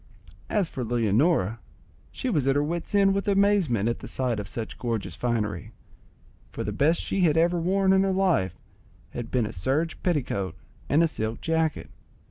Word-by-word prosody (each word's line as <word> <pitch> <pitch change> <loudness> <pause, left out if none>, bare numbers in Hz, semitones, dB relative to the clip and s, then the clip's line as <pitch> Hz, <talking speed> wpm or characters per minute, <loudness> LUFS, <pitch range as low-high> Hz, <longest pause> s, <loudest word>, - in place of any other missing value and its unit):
As 205 -5 +1
for 130 - -5
Leonora, 115 - +1 0.5
she 260 - -4
was 150 - +1
at 135 - +3
her 145 - +2
wit's 170 +6 -3
end 195 -1 +5
with 200 +1 -2
amazement 195 - +3
at 120 - -1
the - - -8
sight 125 -4 -1
of 100 - -5
such 110 +3 -6
gorgeous 115 -4 -3
finery, 110 -4 -2 0.8
for - - -4
the - - -3
best 160 +4 +2
she 195 - -2
had 160 -3 +3
ever 170 +1 +3
worn 190 +3 +2
in 190 - +4
her 195 0 +1
life 180 - +1 0.5
had 120 -1 -6
been 125 -2 +1
but 105 - -3
a - - -13
serge 145 - -1
petticoat 130 - -1 0.3
and 155 +4 +4
a - - +4
silk 110 -6 -4
jacket. 160 -1 -1
145 Hz, 185 wpm, -26 LUFS, 115-180 Hz, 0.8 s, end